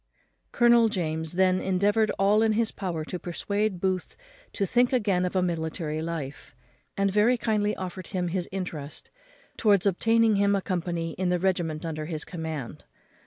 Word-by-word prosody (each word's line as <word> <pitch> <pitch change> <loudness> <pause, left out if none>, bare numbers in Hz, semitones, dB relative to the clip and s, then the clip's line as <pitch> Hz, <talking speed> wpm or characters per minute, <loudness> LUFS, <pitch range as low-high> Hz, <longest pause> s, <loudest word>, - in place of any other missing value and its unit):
Colonel 235 -1 +5
James 160 -4 -2
then 185 0 +3
endeavoured 205 +3 +2
all 205 +2 +4
in 220 -1 +3
his 225 0 +1
power 170 -5 -4
to 180 - -5
persuade 200 +3 -2
Booth 185 -1 -2 0.3
to 200 - -1
think 245 +5 +2
again 200 -8 +1
of 180 - -3
a 185 - +3
military 160 -2 -2
life, 160 -7 -6 0.4
and 195 0 +2
very 220 +4 +4
kindly 210 -2 0
offered 185 -1 -6
him 180 -3 -2
his 180 0 -3
interest 165 -6 -6 0.5
towards 205 -4 +3
obtaining 225 +3 +3
him 200 0 +3
a 195 - 0
company 170 -2 -2
in 185 -1 +1
the 180 - +2
regiment 175 -4 -1
under 155 -2 -4
his 155 -2 -4
command. 160 -7 -6
185 Hz, 165 wpm, -27 LUFS, 165-205 Hz, 0.5 s, Colonel